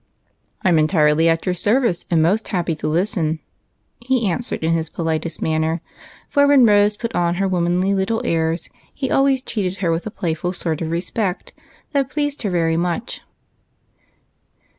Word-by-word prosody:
" - - -46
I 190 - +3
'm 165 -3 +4
entirely 155 0 +3
at 165 0 0
your 185 - +1
service, 215 +1 +1
and 165 -2 +3
most 200 +7 +1
happy 175 -4 -1
to 155 - -4
listen," 160 -1 0 0.6
he 240 -2 0
answered, 190 0 -2
in 165 +1 +2
his 160 -1 -1
politest 160 0 -3
manner, 160 +1 0 0.5
for 285 -1 +3
when 280 -3 +6
Rose 205 -1 +4
put 230 - -4
on 175 0 +1
her 195 +2 0
womanly 180 +1 +1
little 195 +4 0
airs 165 0 0 0.2
he 265 -2 -4
always 270 -1 +3
treated 195 -6 -3
her 175 -4 0
with 165 +5 -2
a - - -2
playful 175 -3 -3
sort 165 -3 -2
of 160 - -2
respect 180 +3 -2 0.4
that 275 -3 0
pleased 290 0 -2
her 210 - -1
very 165 -2 +1
much. 175 +7 -2
180 Hz, 170 wpm, -20 LUFS, 165-215 Hz, 0.6 s, when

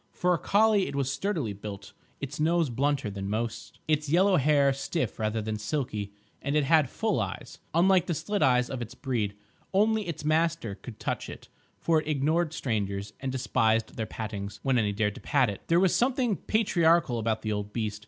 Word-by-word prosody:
For 180 0 +2
a 170 - 0
collie 210 -1 +3
it - - -5
was 135 -1 0
sturdily 155 - -2
built, 100 0 -8 0.3
its 140 +1 -6
nose 165 -2 +2
blunter 140 -2 0
than 100 0 -5
most, 110 +2 -4
its 155 -1 +1
yellow 185 +4 +4
hair 140 -1 +4
stiff 145 +3 -3
rather 110 0 -1
than 110 0 -3
silky, 105 -3 -3 0.3
and 140 +1 -1
it 150 - +3
had 150 -1 +4
full - - 0
eyes, - - -5 0.2
unlike 180 +1 +4
the 170 - 0
slit 205 +7 -2
eyes 125 -1 +4
of 130 -2 -5
its 120 +2 -7
breed. 115 -8 -2 0.4
Only 215 +1 +3
its 160 -3 -5
master 160 -7 +1
could 110 +2 -11
touch - - -3
it, - - -10 0.3
for 160 -2 +2
it - - -12
ignored 155 +3 +1
strangers, 105 -7 -2
and 135 0 -3
despised 115 -3 +1
their 110 -2 -3
pattings—when 110 +4 -2
any 105 -2 +1
dared 105 0 0
to - - -11
pat 130 -6 +2
it. 100 - -9
There 170 +1 +4
was 185 -1 +3
something 245 -3 +2
patriarchal 170 - +2
about 110 0 -1
the 110 - -1
old 105 0 -3
beast. 105 -2 -3
135 Hz, 195 wpm, -28 LUFS, 110-165 Hz, 0.4 s, yellow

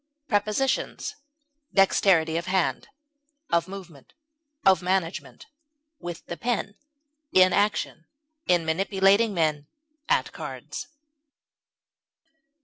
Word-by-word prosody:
Prepositions: 215 +5 0 0.6
Dexterity 185 -4 +3
of 170 +2 -2
hand, 185 -2 0 0.6
of 170 0 +2
movement, 180 -8 -11 0.5
of 190 -2 +5
management; 180 -1 -2 0.5
with 175 -1 -7
the 170 - -6
pen; 230 -4 -2 0.6
in 185 0 +5
action, 200 -5 0 0.4
in 175 -2 +3
manipulating 195 +5 +3
men; 155 -5 0 0.4
at - - +2
cards. - - -7
185 Hz, 85 wpm, -26 LUFS, 170-200 Hz, 0.6 s, of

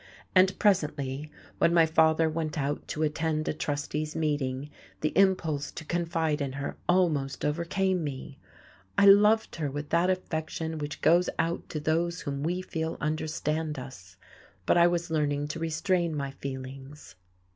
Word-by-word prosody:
And 185 +1 +4
presently, 150 -7 0 0.3
when 170 - +3
my 165 -1 +6
father 160 0 +3
went 155 -1 -3
out 145 0 -2
to 155 - -2
attend 155 0 -1
a - - +1
trustee's 150 +1 -3
meeting, 145 -3 -1 0.3
the 155 - -1
impulse 165 -7 +2
to 155 - -8
confide 165 -3 -1
in 135 -2 -2
her 140 +1 -4
almost 160 -7 +1
overcame 175 +4 0
me; 140 -1 -6 0.6
I 200 - +6
loved 210 +2 +5
her 150 -3 -1
with 145 +2 -5
that 170 +2 +3
affection 160 -3 -3
which 145 0 -5
goes 175 +2 +4
out 165 +1 -1
to 155 - -3
those 165 +3 0
whom 140 -1 -4
we 175 +4 -1
feel 160 -2 -3
understand 155 0 -2
us, 110 -8 -10 0.5
but - - +3
I 170 0 +6
was 170 -1 -1
learning 145 -2 0
to 165 - -4
restrain 165 +1 0
my 140 -2 -3
feelings. 135 +1 -8
155 Hz, 155 wpm, -28 LUFS, 145-170 Hz, 0.6 s, my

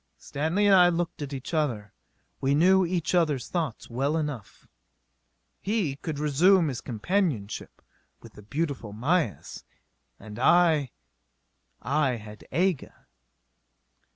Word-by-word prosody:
Stanley 160 +8 -1
and 200 - +5
I 180 -2 +7
looked 170 -2 -3
at 145 -1 -5
each 135 +4 -7
other. 120 -10 -1 0.5
We 135 +1 +1
knew 185 +5 +5
each 175 -1 -1
others 155 -7 +1
thoughts 160 -10 -3
well 135 +6 -1
enough. 145 -10 -6 0.9
He 195 -10 -1
could 155 -1 -5
resume 160 +4 +3
his 130 -2 -5
companionship 120 - -2 0.4
with - - -15
the - - -13
beautiful 135 -2 -4
Mayis. 140 - -1 0.6
And 105 +2 -10
I 160 -2 +4 0.9
I 140 -3 +1
had 105 -1 -11
Aga.... 180 -4 -1
150 Hz, 120 wpm, -26 LUFS, 125-175 Hz, 0.9 s, I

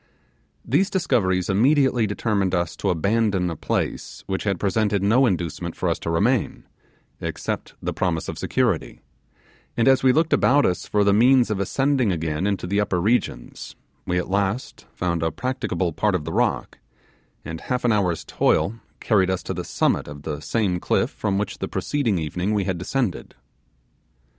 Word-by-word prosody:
These 195 +1 +2
discoveries 95 - +1
immediately 125 +2 +3
determined 100 -2 0
us 85 -2 -1
to - - -1
abandon 100 0 +1
a - - -4
place - - -3
which 95 +2 -3
had 100 -4 0
presented 100 -1 +1
no 120 +6 +4
inducement 85 -3 -3
for - - -2
us - - 0
to - - -4
remain, 105 +8 +1 0.6
except - - -4
the - - -2
promise 85 -4 -1
of - - -5
security; - - -1 0.8
and 115 - +2
as 135 -1 +5
we 130 - +5
looked 160 +4 +2
about 145 +2 +4
us 90 - -1
for 105 -1 +2
the 100 0 +4
means 120 +2 +4
of 100 - -1
ascending 135 +3 +1
again 80 +1 -1
into 100 -3 -1
the 100 +3 0
upper 100 -3 0
regions, 110 +7 -1 0.3
we 90 - 0
at 90 - -1
last 100 +5 -2
found 85 -2 -2
a 80 0 0
practicable 90 -4 -2
part 105 +4 +1
of 80 -5 -2
the - - -4
rock, - - -1 0.7
and 80 0 -6
half 125 -1 -2
an 120 - +4
hour's 90 -6 0
toil 115 +3 +1 0.2
carried 95 -4 +2
us 95 -1 -1
to - - -4
the - - -4
summit - - 0
of 75 0 -9
the 75 -2 -4
same 95 +1 0
cliff - - 0
from 100 -2 -2
which 105 -1 -3
the - - -2
preceding 130 -10 -1
evening 90 +6 -2
we 100 - +1
had 95 -3 -2
descended. 115 +2 -2
100 Hz, 175 wpm, -23 LUFS, 90-115 Hz, 0.8 s, as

